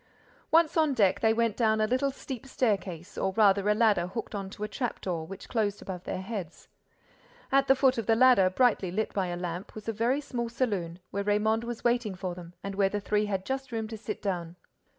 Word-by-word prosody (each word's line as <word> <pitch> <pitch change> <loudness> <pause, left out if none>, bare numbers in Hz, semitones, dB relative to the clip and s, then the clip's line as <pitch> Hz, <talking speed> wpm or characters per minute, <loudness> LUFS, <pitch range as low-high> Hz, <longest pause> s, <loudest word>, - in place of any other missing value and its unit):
Once 330 0 +4
on 310 -4 +3
deck, 195 -5 +3
they 220 - +3
went 230 -1 +1
down 220 -2 +2
a 215 - +3
little 255 +5 +1
steep 265 -2 -7
staircase, 195 -8 -2
or 190 - 0
rather 205 -1 +4
a 210 - +4
ladder 210 -6 +3
hooked 210 +6 -5
on 195 -2 -4
to 210 +1 -8
a - - -1
trap 245 +1 -3
door, 165 -4 -3
which 195 +1 -9
closed 210 -4 -1
above 185 -2 -7
their - - -3
heads. 195 -5 -6 0.8
At 275 0 +4
the 270 - +6
foot 260 -2 +3
of 225 - -4
the 225 - +4
ladder, 245 -6 +6
brightly 205 -2 +2
lit 215 +5 -2
by 190 -2 0
a 175 0 -3
lamp, 175 +1 -5
was 215 0 -9
a 225 - 0
very 235 +6 +1
small 240 -5 -4
saloon, 200 -9 -2
where 200 +1 -2
Raymonde 215 +2 +1
was 235 -1 -5
waiting 240 -4 +1
for 180 -1 -4
them 175 0 -11
and 200 - -4
where 195 0 +2
the 205 - -2
three 210 +1 0
had 195 -2 -2
just 265 -1 -3
room 225 -1 -2
to 225 - -5
sit 215 - -6
down. 175 -4 -3
210 Hz, 230 wpm, -29 LUFS, 190-235 Hz, 0.8 s, the